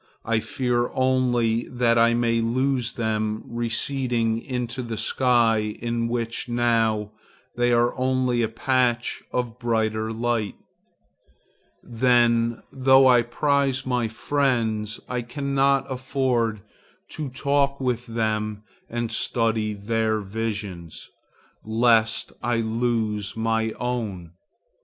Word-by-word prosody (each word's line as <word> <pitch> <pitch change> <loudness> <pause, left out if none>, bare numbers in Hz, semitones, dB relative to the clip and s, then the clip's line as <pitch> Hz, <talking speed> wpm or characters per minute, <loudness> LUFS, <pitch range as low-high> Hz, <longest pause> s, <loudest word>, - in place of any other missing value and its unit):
I 115 -1 +1
fear 120 +1 -1
only 120 -3 +1
that 120 -2 +2
I 115 0 +4
may 115 -1 +1
lose 125 +1 0
them 110 -1 -2
receding 120 -1 -1
into 125 0 -4
the 115 -2 -5
sky 115 -2 +2
in 115 0 -2
which 115 0 -3
now 115 -3 +1 0.4
they 120 0 +2
are 120 0 +2
only 130 -1 +1
a 115 - +2
patch 125 0 0
of 125 -1 -3
brighter 110 -2 0
light. 115 -2 -1 1.3
Then, 120 -1 +2
though 130 0 +5
I 125 -2 +6
prize 135 +2 0
my 125 -3 0
friends, 110 -3 -1
I 125 -1 -2
cannot 140 +2 +1
afford 130 -4 -1 0.5
to 150 -3 -5
talk 140 +1 0
with 125 -2 -2
them 110 -2 -2 0.3
and 120 0 -3
study 110 -2 0
their 110 +1 0
visions, 100 -5 -5 0.5
lest 115 0 +2
I 120 0 0
lose 110 -3 -1
my 110 0 0
own. 110 -9 -4
120 Hz, 110 wpm, -24 LUFS, 110-125 Hz, 1.3 s, I